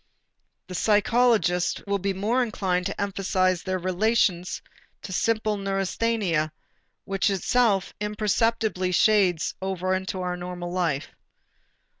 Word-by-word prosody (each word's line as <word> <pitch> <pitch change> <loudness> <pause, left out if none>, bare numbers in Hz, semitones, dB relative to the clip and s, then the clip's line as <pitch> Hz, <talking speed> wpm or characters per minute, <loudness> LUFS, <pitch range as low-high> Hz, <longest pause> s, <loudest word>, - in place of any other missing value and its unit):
The 185 - -9
psychologist 210 -3 +2
will 200 0 0
be 195 +1 -1
more 210 +7 0
inclined 190 -6 -1
to 200 - -6
emphasize 185 -2 0
their 185 -1 -2
relation 185 0 +1 0.6
to 185 - -6
simple 215 0 +1
neurasthenia 195 -4 0 0.5
which 195 +1 +1
itself 200 +1 +1
imperceptibly 210 -2 0
shades 185 -5 +3
over 185 -1 -1
into 190 0 -2
our 180 -1 -2
normal 175 0 -6
life. 165 -6 -1
195 Hz, 110 wpm, -25 LUFS, 180-215 Hz, 0.6 s, shades